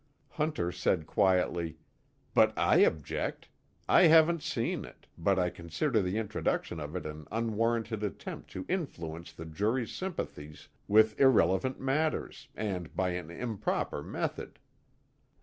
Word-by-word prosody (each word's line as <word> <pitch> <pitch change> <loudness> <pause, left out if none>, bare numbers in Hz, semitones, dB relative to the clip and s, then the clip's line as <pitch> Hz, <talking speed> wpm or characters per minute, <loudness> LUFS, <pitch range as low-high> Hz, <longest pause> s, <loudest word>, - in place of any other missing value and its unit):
Hunter 150 - -1
said 85 -2 0
quietly: 85 -2 +1 0.6
"But - - +4
I - - +4
object. 80 -3 0 0.4
I 180 - +7
haven't 165 +1 +6
seen - - -2
it, - - -14
but 95 +4 +1
I 90 -1 +1
consider 90 - -1
the 90 +2 -1
introduction 105 -5 -2
of 75 +3 -6
it 90 - -4
an 75 -1 -7
unwarranted 115 0 0
attempt 105 -2 -5
to 95 - -5
influence 85 - -4
the 80 - -9
jury's 105 +9 -1
sympathies 75 - -6 0.2
with 110 +1 +4
irrelevant 130 -1 +4
matters, 150 +4 -1
and 90 -8 -4
by 95 -1 +1
an 90 -2 -5
improper 105 -5 -2
method." - - -4
100 Hz, 130 wpm, -30 LUFS, 85-120 Hz, 0.6 s, I